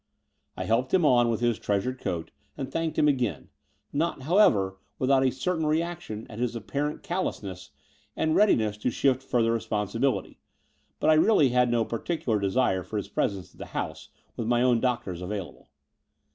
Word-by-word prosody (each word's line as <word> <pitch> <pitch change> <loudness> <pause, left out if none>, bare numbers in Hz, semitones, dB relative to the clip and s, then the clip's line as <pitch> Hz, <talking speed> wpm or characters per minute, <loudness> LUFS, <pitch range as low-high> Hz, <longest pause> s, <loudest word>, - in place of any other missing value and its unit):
I - - -3
hdped 125 +6 +1
him 175 -4 +3
on 120 -4 +4
with 115 0 -1
his 120 -2 +1
treasured 105 +6 -1
coat 85 -2 -3 0.3
and 135 - -3
thanked 165 -1 -2
him 150 - +4
again, 125 -7 0 0.4
not, 150 -2 -1
however, 105 - +3 0.2
without 130 0 +3
a 130 - +4
certain 160 +5 -1
reaction 160 -8 -2
at 110 - -9
his 120 -1 -1
apparent 140 +7 -3
callousness 100 - -4 0.5
and 160 0 +1
readiness 110 - +3
to 105 - -1
shift 130 +1 +1
further 120 -3 +1
responsibility; 115 +3 -1 0.6
but - - +4
I - - +7
really 155 -3 +5
had 125 0 +3
no 120 -1 +2
particular 115 -2 -1
desire 100 -1 +1
for 105 - -5
his 100 -1 -4
presence 100 -2 -2
at - - -22
the - - -7
house, - - -4 0.3
with 115 - -3
my 120 0 +3
own 125 -2 +4
doctors 120 -8 -2
available. 95 -1 -6
120 Hz, 170 wpm, -27 LUFS, 105-145 Hz, 0.6 s, I